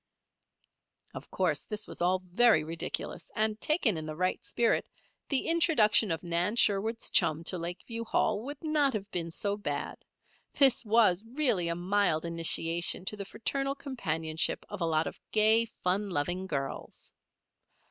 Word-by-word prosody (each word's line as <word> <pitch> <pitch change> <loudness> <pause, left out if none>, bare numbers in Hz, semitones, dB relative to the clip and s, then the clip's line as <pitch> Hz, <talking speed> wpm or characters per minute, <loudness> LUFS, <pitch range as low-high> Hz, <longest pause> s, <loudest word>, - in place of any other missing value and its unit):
Of - - -9
course - - 0
this 210 -1 -5
was - - -10
all 185 +1 +1
very 190 -2 +4
ridiculous, 165 +2 -4
and, 215 0 0
taken 285 - +2
in 155 0 -5
the 155 - -5
right 185 +3 -1
spirit, 235 -1 +1 0.4
the 275 -3 0
introduction 305 - +3
of 165 0 -2
Nan 175 +5 0
Sherwood's 220 +1 +1
chum 155 +2 +2
to 180 +1 -1
Lakeview 180 +7 -5
Hall, 215 -1 0
would 285 +5 -8
not 300 -3 +1
have 205 0 -5
been 170 -4 -2
so 200 +4 -2
bad. 205 - -4 0.6
This 270 -2 +5
was 215 -4 +3
really 230 - +1
a 170 - -1
mild 180 -2 0
initiation 170 +1 +1
to 210 - -2
the 200 -1 -7
fraternal 275 +7 -2
companionship 165 - -2
of 205 -3 -7
a - - +1
lot 160 0 +1
of - - -7
gay, 220 +2 +5 0.2
fun 195 +3 0
loving 175 +3 -2
girls. 135 -5 -6
200 Hz, 155 wpm, -29 LUFS, 170-230 Hz, 0.6 s, This